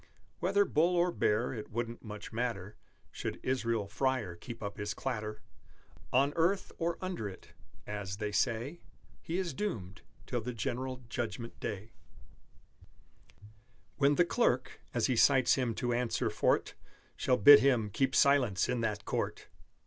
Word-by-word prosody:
Whether 195 +3 +3
bull 170 +1 +2
or 175 +1 +3
bear, 110 -4 +1
it 110 -4 -7
wouldn't 115 +1 -4
much 105 -1 -8
matter 110 -4 -3 0.4
Should - - -5
Israel 115 -4 0
Freyer 115 -4 -1
keep 115 +6 -9
up 100 0 -5
his 105 0 -3
clatter 110 -5 -4 0.7
On 140 +3 +3
earth 175 +4 +1
or 170 0 0
under 180 - -3
it 95 - -13 0.4
(as, 100 -2 -5
they 105 -1 -3
say, 120 +9 -1 0.4
He 170 - -3
is 185 -3 -2
doomed) 110 - -4 0.2
till 120 -2 -2
the 125 +3 -4
general 125 +3 -3
Judgment 115 -1 -5
Day, 105 +2 -5 2.1
When 140 0 +4
the 175 - +4
Clerk, 135 - 0
as 120 -2 +1
he 130 - +1
cites 130 +2 +5
him 125 -4 0
to 120 -1 -1
answer 120 -3 0
for - - +3
't, - - -11 0.4
Shall 125 - +2
bid 145 +7 +10
him 120 -6 +2
keep 135 +5 +1
silence 125 -10 +4
in 125 -1 -1
that 105 -2 -2
Court! - - -3
120 Hz, 150 wpm, -32 LUFS, 105-140 Hz, 2.1 s, bid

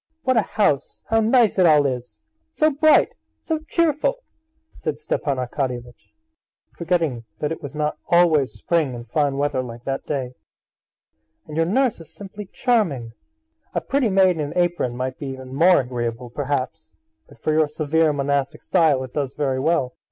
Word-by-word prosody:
What 255 - +2
a 225 - +5
house, 195 -9 0
how 225 - +4
nice 225 -2 +3
it 180 - +6
all 150 -2 +5
is! 125 -2 -4 0.3
So 310 -1 +2
bright, 305 +2 +5 0.3
so 320 -2 -2
cheerful!" 335 - 0 0.6
said 150 -2 -3
Stepan 150 -2 -2
Arkadyevitch, 125 -1 -4 0.6
forgetting 165 -9 -1
that 150 +5 -2
it 165 - -4
was 145 -1 -8
not 150 0 -2
always 165 -6 +4
spring 155 -7 -1
and 120 0 -9
fine 145 -3 0
weather 145 -2 0
like 120 -1 -9
that 135 +1 -4
day. 130 -4 -3 1.1
"And 150 - -9
your 165 0 +2
nurse 250 +3 +1
is 160 -1 -13
simply 205 0 -9
charming! 170 - 0 0.6
A - - +3
pretty 275 -4 +1
maid 190 -3 +4
in - - -5
an 145 -1 -3
apron 175 -9 0
might 130 0 -3
be 145 - -5
even 130 -1 -7
more 170 +3 +5
agreeable, 120 -1 -4
perhaps; 140 0 -3 0.4
but - - -17
for 155 - -1
your 155 0 +3
severe 155 +1 +1
monastic 140 -1 -1
style 150 -6 +3
it 130 - -9
does 140 -3 -2
very 135 -3 0
well." 140 -3 +1
150 Hz, 165 wpm, -22 LUFS, 130-180 Hz, 1.1 s, it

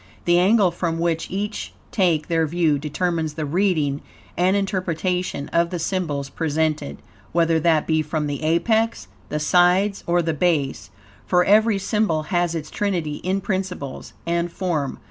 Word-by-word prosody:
The 175 0 +4
angle 195 0 +4
from 170 -1 -2
which 165 -1 -1
each 205 +3 -4 0.2
take 170 -7 +1
their 165 -2 +1
view 160 -2 +1
determines 160 +1 -2
the 155 - -2
reading 155 -4 +1 0.3
and 185 +3 +2
interpretation 185 -5 -1
of 170 0 +2
the 180 - -3
symbols 165 -5 -2
presented, 155 - -1 0.4
whether 165 -1 +3
that 160 -1 +2
be 155 -1 +2
from 155 0 -2
the 145 -1 -3
apex, 220 - +1 0.2
the 150 - -2
sides 180 +6 +3
or 175 0 +2
the 165 0 0
base, 155 -4 0 0.4
for 180 0 +3
every 215 +1 +4
symbol 195 -5 0
has 175 -1 +1
its 155 -2 -5
trinity 170 -8 -1
in 190 +2 -1
principles 185 -8 -4
and 170 0 -1
form. 165 -7 -2
170 Hz, 150 wpm, -22 LUFS, 155-185 Hz, 0.4 s, The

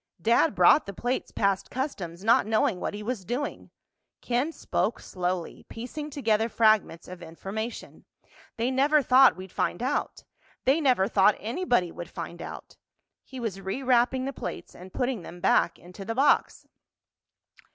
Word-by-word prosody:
"Dad 230 - +3
brought 180 - +5
the 200 - -7
plates 245 +5 -2
past 195 -2 0
customs 195 - -5
not 225 -1 +4
knowing 215 -4 +1
what - - -3
he 210 - -6
was 225 -3 -3
doing." 245 +8 -4 0.5
Ken 250 +6 -1
spoke - - -2
slowly, 180 -1 -4
piecing 255 +6 -6
together 225 -6 0
fragments 215 -7 +2
of 180 0 -10
information. 195 +7 -7 0.5
"They 235 +3 0
never 285 +3 +3
thought 260 +1 +6
we'd 185 0 -10
find 175 - -2
out—they 275 +1 -2
never 250 -9 +3
thought 205 -1 +4
anybody 235 - 0
would 170 0 -8
find 170 0 -7
out." - - -9 0.5
He 260 - -10
was 220 -5 -4
rewrapping 250 +5 +1
the 275 - -3
plates - - -7
and 185 +1 -12
putting 250 -3 -2
them 175 +1 -10
back 175 - +2
into 180 +3 -11
the 225 +3 -4
box. 275 +4 +2
225 Hz, 150 wpm, -27 LUFS, 185-260 Hz, 0.5 s, thought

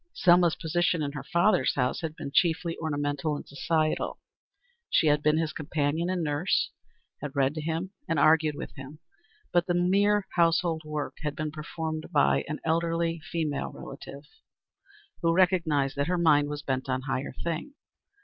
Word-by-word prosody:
Selma's 175 -2 +5
position 170 0 0
in 140 - -2
her 140 -2 -6
father's 170 +1 +2
house 125 -2 0
had 160 -2 -4
been 140 - -6
chiefly 170 -1 +2
ornamental 145 -1 -1
and - - -8
social. 155 +2 -1 0.7
She - - +3
had 150 -1 +3
been 150 +1 +3
his 160 -2 -1
companion 155 +2 -1
and 185 -2 -1
nurse, 150 +4 0 0.5
had 145 0 -6
read 135 0 +2
to 155 - -4
him 165 +4 -3 0.2
and 165 - 0
argued 155 +1 +4
with - - -7
him, 135 +1 -10 0.6
but 175 +1 +3
the 175 - +1
mere 200 +3 +3
household 170 -1 +2
work 150 -1 -4
had 150 -1 -3
been 155 -1 -3
performed 155 +1 -5
by 145 - +3
an 150 - -4
elderly 165 0 0
female 160 -2 -3
relative 140 +1 -9 1.0
who 165 -1 +2
recognized 165 -7 +2
that 140 - 0
her 180 +1 +1
mind 150 -4 +4
was 150 0 -5
bent 130 0 -2
on 130 0 0
higher 135 -1 -3
things. 170 - -3
155 Hz, 165 wpm, -28 LUFS, 145-170 Hz, 1.0 s, Selma's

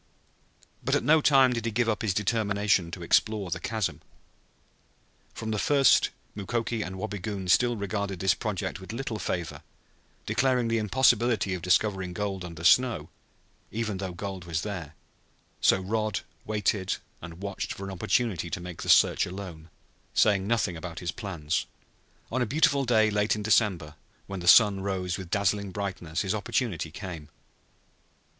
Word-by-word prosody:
But - - +1
at - - +1
no 155 +4 +5
time 135 -3 +5
did 115 -1 -3
he - - +1
give 120 +2 +1
up 110 -2 0
his 105 -5 0
determination 100 -3 +1
to 85 0 -7
explore 100 +1 +1
the - - -2
chasm. 110 -4 -2 1.3
From 110 -1 -4
the 105 - -1
first 140 -1 +4 0.3
Mukoki 115 +2 -2
and 95 -2 -5
Wabigoon 100 -1 -4
had 120 +4 +3
regarded 100 -2 -3
this 95 -1 +3
project 100 -3 -3
with 95 +3 -8
little 115 -3 -4
favor, 85 -6 -3 0.6
declaring 125 -3 +1
the 115 0 +1
impossibility 115 -2 +2
of 90 - -4
discovering 95 0 +1
gold 100 -2 -3
under 85 -2 -8
snow, 125 +6 +4 0.6
even 110 -3 -3
though 95 -2 -3
gold 95 0 -6
was 85 -1 -2
there; 90 -7 -6 0.7
so - - +4
Rod 110 +2 -1 0.3
waited 105 -2 0 0.2
and 85 +2 -9
watched 100 -1 -4
for 100 - -6
an 95 - -5
opportunity 95 -1 0
to - - -3
make 90 -1 -8
the - - -5
search - - +5
alone, 90 -4 -8 0.5
saying 100 -3 +3
nothing 110 -6 +1
about 85 0 -7
his 85 0 -3
plans. 85 -8 -3 0.6
On 130 +2 0
a 120 - +1
beautiful 140 +1 +2
day 110 -3 +3
late 105 +1 +1
in 105 - -5
December, 100 -8 +2 0.3
when 95 -1 -6
the 85 - -6
sun 100 +1 +7
rose 95 -2 -2
with 95 -2 -8
dazzling 100 +1 0
brightness, 95 -4 -3
his 95 0 -1
opportunity 100 -5 -2
came. 85 -3 -8
100 Hz, 160 wpm, -27 LUFS, 90-110 Hz, 1.3 s, sun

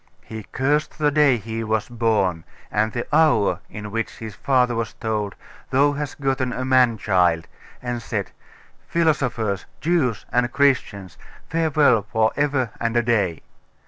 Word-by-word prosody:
He 110 -2 -8
cursed 145 +3 0
the 150 -1 +2
day 145 -4 +4
he 115 +1 -5
was 110 -1 -1
born, 110 -8 0 0.3
and 110 +1 +1
the 120 +1 -3
hour 110 - +3
in 105 -1 -7
which 115 +1 -3
his 110 -2 -7
father 125 -1 +2
was 115 -1 -3
told, 105 -3 -3 0.3
"Thou 140 +2 +3
hast 145 0 -5
gotten 135 -2 0
a 130 +1 -3
man 130 -3 +4
child," 90 -5 +2 0.4
and 120 -1 -3
said, 110 -4 -4 0.6
"Philosophers, 125 - 0
Jews, 150 - 0
and 120 0 +1
Christians, 100 - 0 0.3
farewell 155 -7 +3
for 110 0 +2
ever 140 -5 0
and 115 0 0
a 120 - +3
day! 100 -8 0
120 Hz, 145 wpm, -22 LUFS, 105-135 Hz, 0.6 s, day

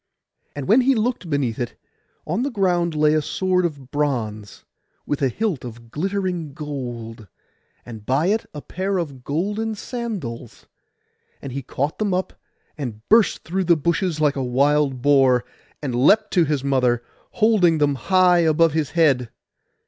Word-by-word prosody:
And 145 -2 -5
when 235 +6 +5
he 265 +1 +3
looked 220 -5 -1
beneath 135 -6 -1
it, 120 -2 -4 0.5
on 180 +9 -1
the 275 - 0
ground 175 - 0
lay 150 0 +3
a 155 - +2
sword 185 +4 0
of 140 -6 -5
bronze, 115 -9 -3 0.4
with 145 - -2
a 135 - +3
hilt 195 - -2
of 115 -1 -10
glittering 180 -3 -3
gold, 120 -7 -6 0.6
and 110 -3 -9
by 135 +8 +1
it 215 +4 0
a 150 - -8
pair 190 +2 -2
of 140 -7 -5
golden 205 - -2
sandals; 200 - -6 0.7
and 135 - -7
he 140 +2 -4
caught 140 +4 -3
them 205 -4 0
up, 185 - -2 0.5
and 115 -5 -6
burst 225 0 +4
through 185 +3 -2
the 170 -1 +4
bushes 170 +1 0
like 150 -2 +2
a 135 - -2
wild 135 +1 +1
boar, 135 -4 +4 0.4
and 135 -4 -2
leapt 205 - +3
to 175 -3 +4
his 145 -3 -1
mother, 125 -3 +1 0.3
holding 210 -7 +3
them 145 -1 +2
high 180 +6 +3
above 165 -1 +3
his 155 -3 0
head. 135 -8 +3
150 Hz, 160 wpm, -22 LUFS, 130-185 Hz, 0.7 s, when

